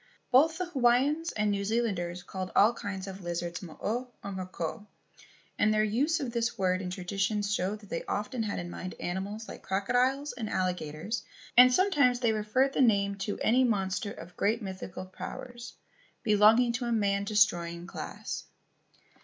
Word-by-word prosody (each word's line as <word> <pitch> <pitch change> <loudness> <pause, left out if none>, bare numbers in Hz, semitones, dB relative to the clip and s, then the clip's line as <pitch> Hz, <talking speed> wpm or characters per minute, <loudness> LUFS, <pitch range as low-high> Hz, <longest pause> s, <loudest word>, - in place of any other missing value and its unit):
Both 315 +6 +5
the 365 - -1
Hawaiians 285 +2 +2
and 210 -1 +1
New 200 0 -1
Zealanders 195 -6 -1
called 185 -1 -5
all 215 +4 +6
kinds 195 -4 -5
of 195 0 -8
lizards 175 0 -3
mo 170 -5 -10
o 245 +4 -1 0.2
or 200 - -5
mo 185 -1 -5
ko; 185 +4 -5 0.7
and 215 - +4
their 215 0 +3
use 275 +10 +1
of 265 -5 -3
this 235 0 -1
word 185 -1 +1
in 180 - -4
traditions 195 +3 -1
showed 205 +2 -1
that 205 - -15
they 165 - -2
often 220 +4 -2
had 215 -2 -2
in 175 0 -5
mind 185 +1 -6
animals 200 +5 -4
like - - -9
crocodiles 250 +8 +1
and 230 -3 -5
alligators, 180 +3 -2 0.3
and 250 +1 +9
sometimes 280 -7 +3
they 235 -3 +2
referred 220 +6 +1
the - - +1
name 200 -5 +3
to 200 +1 -3
any 250 +4 +4
monster 200 -3 0
of 175 0 -11
great 220 +3 +1
mythical 190 -3 -6
powers 240 +5 -8 0.5
belonging 220 +3 +5
to 245 +1 -2
a 235 - -1
man 200 -3 +1
destroying 175 -5 +2
class. 195 - -6
210 Hz, 170 wpm, -29 LUFS, 190-240 Hz, 0.7 s, and